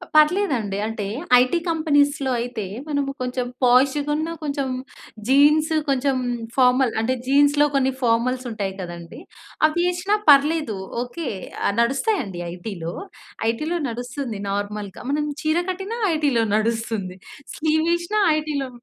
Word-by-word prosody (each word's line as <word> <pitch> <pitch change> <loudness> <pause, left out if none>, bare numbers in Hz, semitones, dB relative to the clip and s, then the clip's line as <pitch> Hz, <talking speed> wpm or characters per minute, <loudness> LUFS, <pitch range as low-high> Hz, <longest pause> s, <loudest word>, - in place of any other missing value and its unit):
పర్లేదండి, 300 - +3
అంటే 225 -2 -4 0.3
ఐటీ 255 +7 +2
కంపెనీసులో 290 -4 +2
అయితే, 235 -4 -4 0.2
మనము 285 -1 -1
కొంచెం 250 0 -2 0.2
పోషుగునా, 290 +5 +3
కొంచెం 280 -2 -2 0.6
జీన్సు, 300 +4 +4
కొంచెం 270 0 +1 0.4
ఫార్మల్, 255 -1 +4
అంటే 250 +3 +1
జీన్స్‌లో 285 +2 +4
కొన్ని 265 -1 +2
ఫార్మల్స్ 250 +2 +1
ఉంటాయి 200 -3 -3
కదండీ! 170 -1 -8 0.5
అవి 345 +3 -1
ఏసినా 380 +4 0
పర్లేదు, 290 -5 +4 0.3
ఓకే. 295 +5 -6 0.4
ఆహ్, 200 - +1
నడుస్తాయండి 270 - 0
ఐటీలో. 175 -2 -6 0.6
ఐటీలో 310 +9 -2
నడుస్తుంది 245 -1 -5
నార్మల్‌గా. 205 0 -4
మనం 295 +1 0 0.2
చీర 310 +2 +2
కట్టినా 390 +5 -4 0.2
ఐటీలో 285 -7 +2
నడుస్తుంది. 220 -4 -1 0.4
స్లీవేసినా 335 +5 +1 0.2
ఐటీలో 300 -3 -2
275 Hz, 110 wpm, -22 LUFS, 230-310 Hz, 0.6 s, జీన్సు